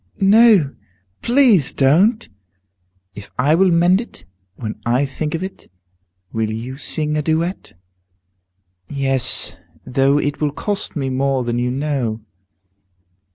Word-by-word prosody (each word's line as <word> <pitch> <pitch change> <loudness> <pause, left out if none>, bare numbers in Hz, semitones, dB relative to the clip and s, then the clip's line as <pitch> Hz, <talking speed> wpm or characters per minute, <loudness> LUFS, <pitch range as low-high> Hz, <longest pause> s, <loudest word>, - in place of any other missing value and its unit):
"No, 200 -7 +5 0.5
please 235 - +3
don't!" 180 - +2 0.9
"If 100 -1 -11
I 140 +5 +2
will 185 +3 +3
mend 175 +4 +3
it 100 - -12 0.3
when 110 0 -7
I 125 +4 +1
think 150 +3 -4
of 165 - -4
it, 190 - -9 0.6
will 110 -1 -1
you 115 +4 -6
sing 150 +1 -3
a - - 0
duet?" 165 +4 -2 1.2
"Yes, 135 -2 +2 0.3
though 135 +2 +2
it 145 0 -2
will 145 -1 0
cost 205 +5 -4
me 135 -3 -2
more 135 0 0
than 120 0 -2
you 125 0 -1
know." 130 -4 -2
145 Hz, 125 wpm, -19 LUFS, 130-175 Hz, 1.2 s, No